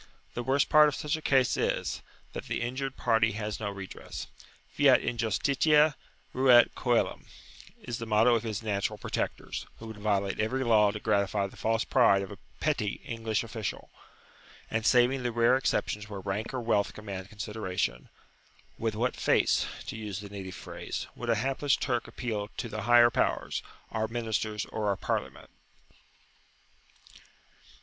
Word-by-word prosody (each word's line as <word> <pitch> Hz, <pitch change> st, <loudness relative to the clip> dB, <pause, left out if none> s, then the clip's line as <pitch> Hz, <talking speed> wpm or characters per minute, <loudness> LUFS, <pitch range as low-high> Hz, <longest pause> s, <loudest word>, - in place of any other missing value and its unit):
The 120 Hz, -, -3 dB
worst 135 Hz, +3 st, +2 dB
part 150 Hz, 0 st, +7 dB
of 150 Hz, -, -1 dB
such 150 Hz, +1 st, -1 dB
a 160 Hz, -, -6 dB
case 130 Hz, -4 st, +3 dB
is, -, -, -1 dB, 0.3 s
that -, -, -6 dB
the -, -, -2 dB
injured 135 Hz, +2 st, -3 dB
party 115 Hz, -2 st, +2 dB
has 105 Hz, -1 st, -4 dB
no 105 Hz, -2 st, -2 dB
redress. 100 Hz, -1 st, -7 dB, 0.5 s
"Fiat -, -, +6 dB
injustitia, 140 Hz, +6 st, +2 dB, 0.4 s
ruat 125 Hz, -2 st, +6 dB
coelum," 120 Hz, -2 st, 0 dB, 0.6 s
is 120 Hz, -1 st, -4 dB
the 115 Hz, -, -5 dB
motto 110 Hz, +3 st, +4 dB
of 115 Hz, -, +2 dB
his 110 Hz, -1 st, -4 dB
"natural 100 Hz, -2 st, -1 dB
protectors," -, -, -4 dB
who 115 Hz, -, -10 dB
would 110 Hz, -1 st, -8 dB
violate 100 Hz, -2 st, 0 dB
every 130 Hz, +5 st, 0 dB
law 110 Hz, -4 st, +5 dB
to 105 Hz, -, -4 dB
gratify 100 Hz, -1 st, +1 dB
the 100 Hz, -, -9 dB
false 115 Hz, +1 st, 0 dB
pride 100 Hz, -6 st, +4 dB
of 95 Hz, -, -8 dB
a 100 Hz, -, -10 dB, 0.2 s
petty 130 Hz, -9 st, 0 dB
English 115 Hz, -1 st, -2 dB
official. 110 Hz, -2 st, -5 dB, 0.8 s
And, 110 Hz, 0 st, 0 dB
saving 125 Hz, +1 st, +4 dB
the 120 Hz, -1 st, -1 dB
rare 120 Hz, +2 st, +4 dB
exceptions 105 Hz, -5 st, -1 dB
where 100 Hz, -2 st, -6 dB
rank 100 Hz, +3 st, -3 dB
or 130 Hz, -2 st, -3 dB
wealth 110 Hz, -3 st, +1 dB
command 100 Hz, -3 st, -7 dB
consideration, 105 Hz, -3 st, -3 dB, 0.7 s
with 110 Hz, -1 st, -1 dB
what 120 Hz, +3 st, 0 dB
face, -, -, +2 dB, 0.2 s
to -, -, -6 dB
use 105 Hz, -3 st, -5 dB
the 100 Hz, 0 st, -8 dB
native 95 Hz, -2 st, -7 dB
phrase, -, -, -6 dB
would 120 Hz, -, -5 dB
a 115 Hz, -, +4 dB
hapless 135 Hz, +5 st, +1 dB
Turk 120 Hz, -3 st, -1 dB
appeal 105 Hz, -4 st, -4 dB
to -, -, -3 dB
the 110 Hz, 0 st, -4 dB
higher 120 Hz, 0 st, +7 dB
powers, -, -, 0 dB, 0.3 s
our 110 Hz, 0 st, -1 dB
ministers 110 Hz, -2 st, -2 dB
or 110 Hz, -1 st, -3 dB
our 100 Hz, -1 st, +1 dB
Parliament? -, -, -3 dB
110 Hz, 160 wpm, -29 LUFS, 105-120 Hz, 0.8 s, part